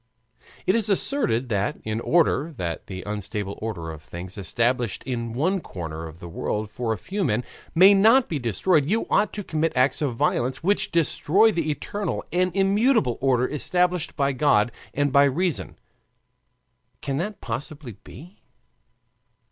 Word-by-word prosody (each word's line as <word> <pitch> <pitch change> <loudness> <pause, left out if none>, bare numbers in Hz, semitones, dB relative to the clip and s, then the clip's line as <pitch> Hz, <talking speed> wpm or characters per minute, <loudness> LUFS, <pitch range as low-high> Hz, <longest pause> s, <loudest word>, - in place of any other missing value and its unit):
It - - +3
is 225 -2 +2
asserted 190 - +1
that, 100 -2 -1
in 110 0 -2
order 160 +1 +1
that 85 -4 -4
the 95 -2 -6
unstable 105 -1 -5
order 90 -7 -4
of 80 -2 -10
things, 90 +3 -8
established 115 +4 -1
in 120 -3 -3
one 165 +11 0
corner 80 - -6
of 80 0 -11
the 85 - -9
world 105 +5 -3
for 115 0 -2
a 110 - -1
few 195 - -3
men, 120 -5 0 0.3
may 190 +4 +8
not 225 +6 +5
be 155 - -2
destroyed, 135 - +1
you 220 +3 +1
ought 210 -1 +3
to 205 - -5
commit 160 -2 -1
acts 130 +4 +2
of 135 -5 -1
violence 130 +4 0
which 200 +4 +1
destroy 170 +6 +3
the 165 -5 -1
eternal 200 +7 -3
and 180 +1 +1
immutable 195 - +2
order 130 -2 +2
established 180 +3 0
by 140 0 +1
God 125 -5 +2 0.2
and 145 -1 0
by 140 0 +6
reason. 165 +5 -1 1.2
Can 135 -1 -2
that 205 +6 -3
possibly 130 0 -5
be? 175 - -13
140 Hz, 155 wpm, -24 LUFS, 110-180 Hz, 1.2 s, may